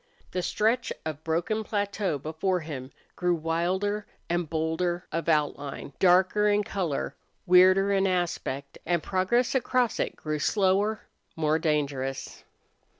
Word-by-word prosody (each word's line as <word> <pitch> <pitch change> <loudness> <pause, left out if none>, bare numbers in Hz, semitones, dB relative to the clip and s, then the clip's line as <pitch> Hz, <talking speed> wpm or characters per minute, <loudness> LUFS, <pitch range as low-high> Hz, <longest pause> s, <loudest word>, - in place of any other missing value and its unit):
The 180 - -1
stretch 230 +7 +1
of 155 -1 -5
broken 175 +7 -1
plateau 200 -5 -1
before 160 +6 -1
him 140 -5 -6 0.3
grew 180 -1 +1
wilder 180 +6 -1 0.2
and 175 -2 0
bolder 165 +2 -1
of 165 0 -2
outline, 145 -3 -1
darker 190 +3 +4
in 205 0 +3
color, 180 -9 -2 0.3
weirder 185 +2 +6
in 195 -1 +3
aspect 170 -6 -2
and 170 -2 0
progress 195 +6 +1
across 250 -2 +1
it - - -1
grew 155 -1 -3
slower, 200 +5 +2 0.3
more 155 0 +1
dangerous. 140 -4 -2
175 Hz, 125 wpm, -27 LUFS, 155-200 Hz, 0.3 s, weirder